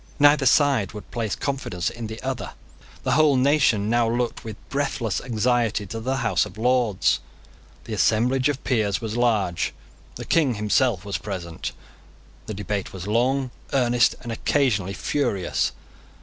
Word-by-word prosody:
Neither 145 -2 +5
side 130 -7 +3
would 105 - -10
place 115 -3 -2
confidence 135 -11 -2
in 115 -1 -6
the 110 +1 -7
other. 130 -2 -4 0.5
The 130 - 0
whole 150 +1 +4
nation 130 -6 +3
now 120 0 +2
looked 120 +1 -2
with 110 -2 -6
breathless 135 -6 -1
anxiety 120 -2 0
to 115 +4 -6
the 130 +4 -1
House 115 - +3
of - - -8
Lords. 120 -4 +2 0.6
The 110 - -6
assemblage 125 +6 +2
of 140 -2 -3
peers 105 -6 +1
was 110 -2 -4
large. 110 -8 +1 0.4
The - - -7
King 145 -8 +2
himself 105 -1 +1
was 100 - -3
present. 85 -5 -5 0.8
The 110 - -4
debate 100 0 -3
was 95 -2 -7
long, 125 +5 +1 0.2
earnest, 125 -2 +3
and 120 - -6
occasionally 110 -6 +1
furious. 100 -7 0
120 Hz, 150 wpm, -24 LUFS, 105-130 Hz, 0.8 s, Neither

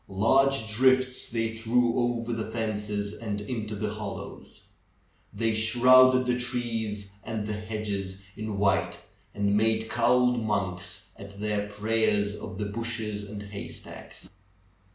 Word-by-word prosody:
Large 135 +5 +3
drifts 130 +3 +3
they 115 -2 0
threw 115 +1 +2
over 120 -1 0
the 110 -1 -3
fences 105 -2 -2
and 105 -3 -4
into 105 0 -4
the 105 +1 -2
hollows. 105 -2 -8 0.7
They 115 -1 0
shrouded 130 +3 +6
the 125 0 +1
trees 115 -5 -2
and 110 -1 -3
the 105 - -3
hedges 105 -3 -4 0.2
in 110 -1 -4
white, 100 0 +2 0.4
and 100 0 +1
made 110 +1 +2
cowled 125 0 +3
monks 95 -3 -2
at 100 0 -11
their 105 -1 -1
prayers 105 -1 +1
of 95 - -8
the 105 - -2
bushes 105 -1 -3
and 105 -1 -6
haystacks. 100 0 -9
110 Hz, 130 wpm, -27 LUFS, 105-120 Hz, 0.7 s, shrouded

